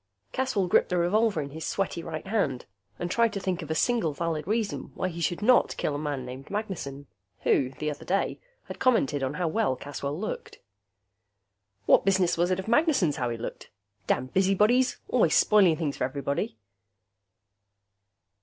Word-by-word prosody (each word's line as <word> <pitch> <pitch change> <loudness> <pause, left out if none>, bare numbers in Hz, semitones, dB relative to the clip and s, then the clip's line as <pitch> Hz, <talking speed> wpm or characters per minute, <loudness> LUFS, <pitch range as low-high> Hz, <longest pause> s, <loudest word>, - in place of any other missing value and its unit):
Caswell 255 -7 0
gripped - - +3
the 180 - 0
revolver 195 +1 +2
in 140 -1 -6
his 160 +2 -7
sweaty 185 0 -2
right 155 -2 -6
hand 195 - -1 0.3
and 175 0 -3
tried 230 +1 +3
to 200 - -2
think 185 -2 -2
of 160 - -8
a 160 - -1
single 230 -7 +1
valid 165 0 -3
reason 215 0 -2
why 185 - -1
he 170 -1 -7
should 175 +4 -1
not 250 +3 +4
kill 150 - -1
a 145 - -3
man 145 -4 -3
named 130 +2 -9
Magnessen, 180 -10 -4 0.4
who, 130 - +2
the 150 0 -2
other 145 - -8
day, 195 +2 -1 0.2
had - - -9
commented 155 - +2
on 135 +2 -2
how 180 0 -1
well 185 -5 +1
Caswell 140 +2 -5
looked. 215 - -5 1.3
What - - +5
business 190 -2 +2
was 175 +1 +1
it 185 - +1
of 190 - -6
Magnessen's 235 - +3
how 125 -1 -1
he 115 - -3
looked? 115 - -7 0.4
Damned 130 - 0
busybodies, 210 +7 +3
always 215 -11 +3
spoiling 190 -7 +5
things 150 -4 -2
for - - -2
everybody.... 140 -2 -2
175 Hz, 175 wpm, -27 LUFS, 145-210 Hz, 1.3 s, What